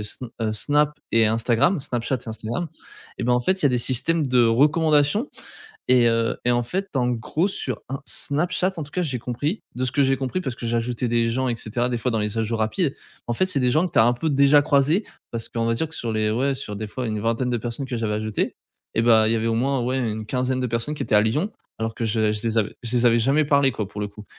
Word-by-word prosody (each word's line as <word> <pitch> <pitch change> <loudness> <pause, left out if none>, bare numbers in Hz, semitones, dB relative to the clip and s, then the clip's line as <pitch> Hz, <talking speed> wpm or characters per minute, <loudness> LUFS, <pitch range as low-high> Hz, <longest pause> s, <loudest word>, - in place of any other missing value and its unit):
S 105 - -4 0.2
heu, 110 -1 0
Snap 145 +7 +2 0.2
et 115 -1 +5
Instagram, 115 - +2
Snapchat 125 0 -2
et - - -6
Instagram. 115 +10 -4 0.5
Et - - -4
ben, 125 - +2
en 125 - +3
fait, 185 +9 0
il - - +1
y - - +7
a - - +4
des 125 -2 +1
systèmes 150 +7 +1
de 125 -2 +4
recommandations 150 - +3 0.6
et 125 -2 +5
heu, 115 0 +1
et 120 - +3
en 120 0 +2
fait 190 +11 -2
en 125 -2 +2
gros, 125 - 0
sur 130 - -3
Ins 135 +1 -4
Snapchat 175 +5 0
en 165 - -4
tout 140 - -13
cas, 180 - 0
j'ai 135 -7 -2
compris 145 - -3
de 130 +1 -2
ce 125 - 0
que 140 - +3
j'ai 135 0 +2
compris, 135 +7 -2
parce 130 -8 -4
que 120 - -9
j'ai 115 0 0
ajouté 120 +1 -1
des 115 0 +1
gens 130 +2 0
et 120 - -1
cetera 120 +3 -2
des 120 -1 -2
fois 125 +2 -1
dans 110 - 0
les 105 +1 -2
ajouts 115 +1 -1
rapides. 135 - 0 0.3
En 120 - -1
fait, 155 +11 +1
c'est 185 -6 +1
des 125 -1 +2
gens 155 +8 +3
que - - -7
tu - - +2
as 110 - +7
un 120 - +4
peu 155 +6 -2
déjà 140 +1 +5
croisés, 145 +8 +2 0.3
parce 115 -1 -3
qu'on 115 -1 -2
va 115 - +1
dire 160 +7 -1
que 160 - -9
sur 115 -6 -3
les 110 0 +1
ouais, 135 +5 +1
sur 110 -6 -6
des 110 +1 -4
fois 125 +4 -5
une 110 -1 -2
vingtaine 115 +3 0
de 120 - +1
personnes 120 +4 -4
que 125 -2 -3
j'avais 110 -2 -1
ajoutées 110 0 -2 0.4
et 115 - +2
ben, 110 -2 +5
il 110 - +2
y - - +2
avait 110 0 -1
au 115 - +1
moins 135 +3 +1
ouais, 130 +2 -1
une 110 -3 -2
quinzaine 130 +2 -1
de 125 - 0
personnes 115 +6 -2
qui - - -4
étaient - - -1
à - - +6
Lyon, 150 - 0 0.3
alors 115 0 -3
que 115 - -2
je 110 -1 +1
je 105 -1 -3
les 115 0 +1
avais 105 -1 -1
je 120 +2 -1
les 120 0 +3
avais 115 0 +5
jamais 135 +6 +3
parlé 140 -2 +3
quoi, 105 -3 -4
pour 105 - -7
le 105 - -1
coup. 105 +1 -13
120 Hz, 280 wpm, -23 LUFS, 115-140 Hz, 0.6 s, y